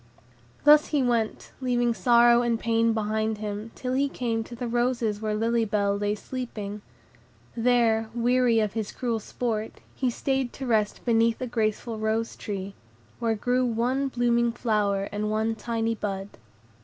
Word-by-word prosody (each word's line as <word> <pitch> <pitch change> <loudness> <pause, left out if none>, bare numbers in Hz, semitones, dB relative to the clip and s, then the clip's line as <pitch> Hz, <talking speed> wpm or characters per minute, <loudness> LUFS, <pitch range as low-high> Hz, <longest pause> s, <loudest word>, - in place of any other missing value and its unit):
Thus 300 0 +7
he 290 -3 +1
went, 235 -3 -1
leaving 240 -2 +1
sorrow 240 0 +5
and 235 -1 0
pain 230 0 +2
behind 220 0 -1
him, 210 +1 -5
till 255 0 -3
he 275 +2 +1
came 230 -4 -2
to 240 - -9
the 245 +1 -4
roses 235 -3 0
where 215 -1 -1
Lily 230 +1 +1
Bell 205 -2 +1
lay 205 +1 -1
sleeping. 210 -4 -6 0.7
There, 230 -2 +2
weary 240 -1 +3
of 215 -2 0
his 220 -2 -3
cruel 235 -3 -2
sport, 220 0 -3 0.2
he 260 - 0
stayed 265 +1 -1
to 270 - -6
rest 215 -4 0
beneath 230 -1 +3
a 255 - -2
graceful 225 -1 -2
rose 220 +1 -1
tree, 195 -1 -5 0.5
where 225 -1 +1
grew 250 +4 +1
one 250 +3 0
blooming 240 -2 +1
flower 210 -4 0
and 210 +1 -2
a 220 +1 0
tiny 230 0 -2
bud. 200 -2 -4
230 Hz, 155 wpm, -26 LUFS, 215-245 Hz, 0.7 s, Thus